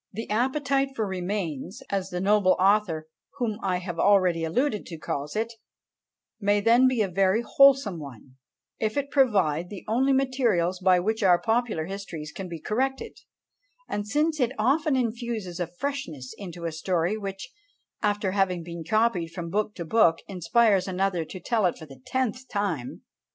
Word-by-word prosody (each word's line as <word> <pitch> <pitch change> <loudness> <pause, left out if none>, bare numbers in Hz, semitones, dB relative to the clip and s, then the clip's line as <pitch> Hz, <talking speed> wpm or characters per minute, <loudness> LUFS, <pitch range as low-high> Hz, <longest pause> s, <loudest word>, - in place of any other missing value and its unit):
"The 225 +3 -6
appetite 270 +3 0
for 220 - -1
Remains," 185 - -4
as 195 -1 -1
the 180 - -3
noble 200 0 +4
author 190 -5 +2 0.3
whom 225 -5 -2
I 185 -2 0
have 175 -2 -6
already 185 -5 +4
alluded 210 - 0
to 165 - -7
calls 145 0 -4
it, 225 +2 -1 0.9
may 205 -1 +2
then 235 +5 +5
be 250 -4 +2
a - - -1
very 195 +4 +2
wholesome 270 -10 +4
one, 130 -2 -11 0.4
if 215 +4 -1
it 280 0 -2
provide 185 - +2
the 200 -3 -8
only 255 +5 +2
materials 240 -10 +1
by 185 -1 +4
which 220 +5 -1
our 180 -3 +5
popular 225 -8 0
histories 175 -5 -7
can 190 -2 -7
be 165 -1 -6
corrected, 265 - -2 0.7
and 205 0 -3
since 305 +6 +1
it 250 -1 +1
often 300 +2 +2
infuses 230 -7 -3
a 175 - -1
freshness 175 - -5
into 175 -4 -8
a 165 - -1
story 175 +3 0
which, 195 -2 -6 0.5
after 205 -2 0
having 185 -3 0
been 170 0 -7
copied 215 -2 +1
from 170 0 -6
book 210 +1 -1
to 170 - -5
book, 165 -3 +4
inspires 195 +1 +2
another 185 -2 0
to 185 - -8
tell 215 +1 +1
it 175 - -3
for 160 - -10
the 135 -3 -14
tenth 260 0 -1
time! 190 - -3
200 Hz, 165 wpm, -26 LUFS, 175-235 Hz, 0.9 s, then